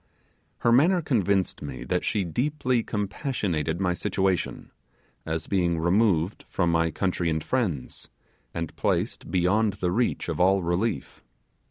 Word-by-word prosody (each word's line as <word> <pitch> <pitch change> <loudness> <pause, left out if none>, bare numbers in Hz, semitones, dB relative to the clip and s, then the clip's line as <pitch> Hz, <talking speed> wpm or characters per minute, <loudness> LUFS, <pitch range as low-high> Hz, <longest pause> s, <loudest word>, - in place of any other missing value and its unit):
Her 120 - +3
manner 165 +10 +5
convinced 100 - 0
me 70 -3 -6
that 90 0 -1
she 105 - 0
deeply 125 - 0
compassionated 100 - -2
my 90 -2 +1
situation, 95 -1 -1 0.6
as 80 0 -2
being 90 -4 +1
removed 90 +1 +2
from 85 -3 +1
my 85 0 +2
country 90 0 -1
and 80 -1 -1
friends, 95 - -2 0.4
and 85 -2 -5
placed - - -1
beyond 95 +4 +2
the 90 -3 -1
reach 120 +6 0
of 85 -2 -3
all 95 +1 +4
relief. 90 +7 -2
95 Hz, 135 wpm, -26 LUFS, 85-110 Hz, 0.6 s, manner